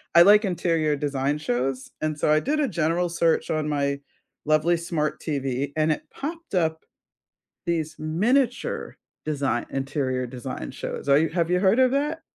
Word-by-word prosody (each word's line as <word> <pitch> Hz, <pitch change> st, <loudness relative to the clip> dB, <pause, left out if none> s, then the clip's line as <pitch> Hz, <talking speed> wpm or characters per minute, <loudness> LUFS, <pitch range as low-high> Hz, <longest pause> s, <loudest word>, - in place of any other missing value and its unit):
I 170 Hz, -, +10 dB
like 210 Hz, +3 st, +7 dB
interior 165 Hz, -5 st, +1 dB
design 140 Hz, 0 st, -1 dB
shows, 130 Hz, -2 st, -2 dB
and 155 Hz, -1 st, -2 dB
so, -, -, +1 dB
I 155 Hz, -, +5 dB
did 305 Hz, +3 st, 0 dB
a 285 Hz, -, +2 dB
general 170 Hz, -1 st, 0 dB
search 170 Hz, -1 st, +1 dB
on 155 Hz, -1 st, -1 dB
my 140 Hz, -1 st, 0 dB, 0.5 s
lovely 155 Hz, +3 st, +3 dB
smart 160 Hz, -3 st, -2 dB
TV 140 Hz, -2 st, -2 dB
and 155 Hz, 0 st, +3 dB
it -, -, -2 dB
popped 330 Hz, -, -6 dB
up 160 Hz, -2 st, 0 dB, 0.8 s
these 160 Hz, -2 st, -1 dB
miniature 230 Hz, -, 0 dB, 0.3 s
design 140 Hz, -5 st, -1 dB
interior 135 Hz, -2 st, -2 dB
design 130 Hz, +1 st, -6 dB
shows. -, -, -6 dB
Are 140 Hz, -, +7 dB
you 160 Hz, 0 st, +1 dB
Have 170 Hz, +1 st, 0 dB
you 180 Hz, -, +3 dB
heard 200 Hz, +6 st, +3 dB
of 255 Hz, -1 st, +5 dB
that? 295 Hz, +4 st, -1 dB
155 Hz, 165 wpm, -25 LUFS, 140-180 Hz, 0.8 s, I